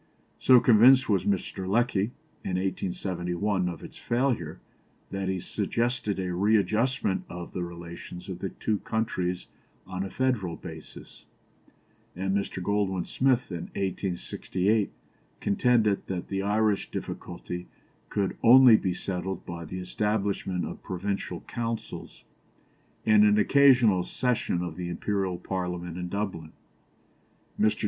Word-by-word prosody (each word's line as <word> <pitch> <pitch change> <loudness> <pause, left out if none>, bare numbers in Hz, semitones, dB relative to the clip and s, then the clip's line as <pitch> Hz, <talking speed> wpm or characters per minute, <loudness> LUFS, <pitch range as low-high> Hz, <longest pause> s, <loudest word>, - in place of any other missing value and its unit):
So 130 -1 +7
convinced 125 +3 +6
was 95 -4 +2
Mr. 95 -1 -1
Lecky, 115 -2 +2 0.4
in 90 - -2
1871, 90 0 -1
of 85 - -7
its - - -10
failure, 120 - -1 0.5
that 95 -1 -2
he 95 -1 -1
suggested 115 +2 -1
a 90 -1 -2
readjustment 110 +3 +2
of 90 -1 -7
the 90 - -3
relations 85 0 -8
of 90 -2 -6
the 95 - -3
two 105 +2 -2
countries 90 -5 -2 0.4
on 95 0 -4
a 95 - -4
federal 110 -9 0
basis; - - -11 0.9
and 95 +2 -1
Mr. 100 -2 -2
Goldwin 100 -2 0
Smith, 130 -4 +1
in 85 -2 -4
1868, 95 +2 -1 0.5
contended 110 -1 +2
that 90 -2 -4
the 95 -1 -1
Irish 105 0 +1
difficulty 90 0 -6 0.4
could 100 -2 -1
only 125 -1 +9
be 90 -4 -1
settled 95 -1 -4
by 85 -1 -6
the 90 +4 -6
establishment 100 -1 -1
of - - -7
Provincial 100 +2 -3
Councils, 115 -1 -5 0.8
and 110 -1 +6
an 105 0 +5
occasional 125 -5 +5
session 120 -8 -1
of 90 - -5
the 90 -1 -4
Imperial 95 +1 -1
Parliament 90 -2 -4
in 90 0 -4
Dublin. 95 -5 -4 1.1
Mr. 110 0 +3
95 Hz, 125 wpm, -27 LUFS, 90-110 Hz, 1.1 s, only